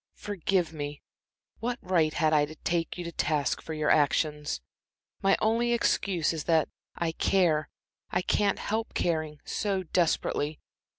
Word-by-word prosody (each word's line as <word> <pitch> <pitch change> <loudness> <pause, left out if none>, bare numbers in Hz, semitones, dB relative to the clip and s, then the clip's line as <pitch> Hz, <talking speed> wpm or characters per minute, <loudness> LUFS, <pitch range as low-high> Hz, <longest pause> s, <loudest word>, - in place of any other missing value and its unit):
Forgive 190 -4 -1
me 145 -1 -5 0.6
what 240 +1 -2
right 170 -4 +2
had 155 0 +2
I 150 -1 +4
to 155 +2 -10
take 170 +2 -2
you 175 - -4
to 170 - -5
task 150 -3 0
for 160 - -6
your 155 -1 +2
actions? 150 0 +2 0.6
My 195 -1 +4
only 235 +2 +2
excuse 185 -8 +1
is 160 - -4
that 160 -2 +3 0.3
I 170 -1 -1
care 165 -3 +2 0.4
I 180 - 0
can't 200 +1 +2
help 220 +2 -3
caring 155 -3 -1
so 195 -3 -1
desperately. 155 -3 0
165 Hz, 145 wpm, -28 LUFS, 155-195 Hz, 0.6 s, I